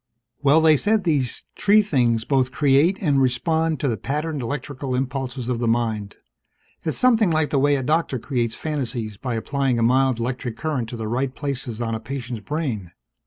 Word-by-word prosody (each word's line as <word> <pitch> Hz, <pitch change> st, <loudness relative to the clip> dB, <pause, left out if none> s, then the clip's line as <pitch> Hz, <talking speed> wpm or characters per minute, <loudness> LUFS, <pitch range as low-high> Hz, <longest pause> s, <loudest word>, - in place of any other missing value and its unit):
"Well, 145 Hz, +3 st, +5 dB
they 160 Hz, -2 st, +6 dB
said 210 Hz, +5 st, +2 dB
these 145 Hz, -8 st, 0 dB
tree 210 Hz, +1 st, +4 dB
things 120 Hz, -, +1 dB
both 130 Hz, -2 st, +1 dB
create 145 Hz, +7 st, +3 dB
and 145 Hz, -7 st, +2 dB
respond 160 Hz, +4 st, +1 dB
to 145 Hz, -, +1 dB
the 115 Hz, -4 st, 0 dB
patterned 150 Hz, +5 st, -3 dB
electrical 135 Hz, +1 st, -4 dB
impulses 130 Hz, -1 st, -3 dB
of 125 Hz, -2 st, -1 dB
the 120 Hz, -, 0 dB
mind. 110 Hz, -3 st, -1 dB, 0.7 s
It's 155 Hz, -, -3 dB
something 230 Hz, -6 st, +4 dB
like 155 Hz, -2 st, +1 dB
the 140 Hz, -, +2 dB
way 145 Hz, +1 st, +3 dB
a 135 Hz, -, -2 dB
doctor 155 Hz, -1 st, +1 dB
creates 120 Hz, -2 st, -2 dB
fantasies 125 Hz, -8 st, -3 dB
by 125 Hz, +1 st, -3 dB
applying 135 Hz, +2 st, 0 dB
a 115 Hz, -, +1 dB
mild 130 Hz, +1 st, +3 dB
electric 120 Hz, -1 st, -3 dB
current 140 Hz, -8 st, -2 dB
to 120 Hz, -, -6 dB
the 110 Hz, -1 st, -4 dB
right 130 Hz, +3 st, -1 dB
places 135 Hz, -5 st, -3 dB
on 115 Hz, -1 st, -2 dB
a 110 Hz, -, -2 dB
patient's 120 Hz, -1 st, -5 dB
brain. 115 Hz, -, -3 dB
135 Hz, 185 wpm, -23 LUFS, 120-150 Hz, 0.7 s, they